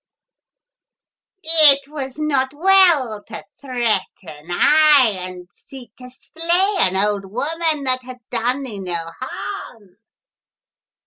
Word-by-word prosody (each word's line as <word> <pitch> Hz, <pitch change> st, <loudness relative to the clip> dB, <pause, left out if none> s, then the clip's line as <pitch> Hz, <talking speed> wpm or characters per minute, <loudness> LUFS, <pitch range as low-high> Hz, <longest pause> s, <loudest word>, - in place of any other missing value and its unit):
" 385 Hz, -, -65 dB
It 305 Hz, -4 st, +4 dB
was 275 Hz, -3 st, -7 dB
not 280 Hz, -3 st, -1 dB
well 325 Hz, -, +3 dB
to 220 Hz, -1 st, -9 dB, 0.2 s
threaten, 200 Hz, -, -3 dB
aye, 285 Hz, -, +4 dB
and 180 Hz, -1 st, -9 dB
seek 245 Hz, -5 st, -14 dB
to 250 Hz, 0 st, -12 dB
slay 340 Hz, +9 st, -1 dB
an 190 Hz, 0 st, +2 dB
old 200 Hz, 0 st, 0 dB
woman 310 Hz, +4 st, -2 dB
that 255 Hz, -1 st, 0 dB
had 255 Hz, 0 st, -11 dB
done 245 Hz, +4 st, -1 dB
thee 220 Hz, -7 st, -7 dB
no 175 Hz, -3 st, -4 dB
harm 210 Hz, -6 st, -8 dB
255 Hz, 115 wpm, -19 LUFS, 210-305 Hz, 0.2 s, It